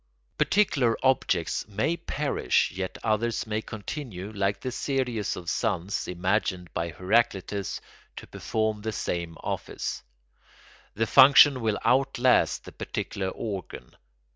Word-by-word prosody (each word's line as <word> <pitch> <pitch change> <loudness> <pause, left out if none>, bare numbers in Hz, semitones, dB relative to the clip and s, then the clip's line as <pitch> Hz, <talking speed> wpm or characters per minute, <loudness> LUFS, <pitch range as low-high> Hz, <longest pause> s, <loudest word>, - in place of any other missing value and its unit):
Particular 140 - +2
objects 95 - +1
may 110 +11 0
perish 150 -4 0
yet 95 +1 -5
others 115 +1 0
may 110 0 -2
continue, 110 -3 -6
like 100 -1 -1
the 130 - -4
series 125 -5 -1
of 85 - -9
suns 100 -2 -1
imagined 90 -1 -1
by 85 0 -2
Heraclitus, 100 +1 0 0.4
to - - -8
perform 110 -1 -2
the 110 +1 -3
same 85 -4 -3
office. - - -4 0.9
The 115 +2 +1
function 130 +2 +7
will 110 -2 0
outlast 130 -1 +3
the - - -9
particular 95 -1 -4
organ. 95 - -6
110 Hz, 115 wpm, -27 LUFS, 95-125 Hz, 0.9 s, function